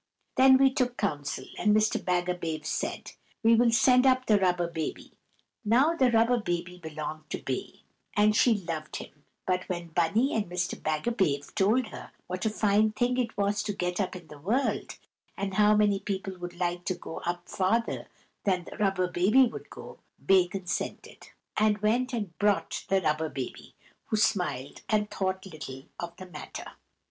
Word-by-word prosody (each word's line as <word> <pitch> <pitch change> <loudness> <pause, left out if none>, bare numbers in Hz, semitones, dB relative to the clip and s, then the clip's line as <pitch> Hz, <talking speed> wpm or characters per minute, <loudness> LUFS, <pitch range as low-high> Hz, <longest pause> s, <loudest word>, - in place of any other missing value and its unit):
Then 265 0 +7
we 270 0 +4
took 250 -1 0
counsel, 145 -8 -2
and 210 -1 +4
Mr. 215 0 +2
Bagabave 175 -3 -1
said, - - -3 0.3
"We 225 +1 +6
will 235 +1 +5
send 250 +3 +5
up 255 0 +3
the 210 -2 +4
Rubber 180 -2 +2
Baby." 160 -2 -5 0.5
Now 250 +9 +4
the 260 -6 +4
Rubber 235 +1 +3
Baby 175 -2 -3
belonged 155 -1 -6
to - - -2
Bay, - - -5 0.3
and 210 0 +4
she 235 0 +5
loved 165 -6 -5
him; 145 - -9 0.2
but 185 0 -1
when 175 -2 -4
Bunny 190 - +2
and 215 -2 0
Mr. 180 0 -2
Bagabave 155 -3 -1
told 215 +4 +2
her - - -9 0.2
what 185 +3 -2
a - - +2
fine 215 0 +2
thing 245 +3 +1
it 230 -2 -2
was 205 +1 +1
to 205 - -3
get 180 +1 -1
up 190 - -2
in 175 -2 -9
the 150 -1 -13
world, 230 - -1 0.4
and 195 -1 -3
how 210 +2 +5
many 205 -2 +3
people 195 -1 -4
would 175 0 -6
like 175 0 -1
to 185 - -1
go 170 -2 -7
up 175 0 -4
farther 220 +5 0 0.4
than 185 -3 +1
the - - -10
Rubber 195 -3 +1
Baby 195 +9 +4
would 235 - -7
go, - - -11 0.3
Bay 190 -2 +5
consented, 180 0 -5 0.3
and 215 -1 +3
went 235 +5 +1
and 205 -8 -4
brought 205 -1 +1
the 195 0 +3
Rubber 155 -1 0
Baby, 130 -4 -7 0.3
who 215 - 0
smiled 160 - 0
and 210 -1 +1
thought 190 0 -2
little 155 -7 -8 0.2
of 170 0 -6
the 185 - -8
matter. 160 -5 -8
195 Hz, 175 wpm, -28 LUFS, 175-220 Hz, 0.5 s, Then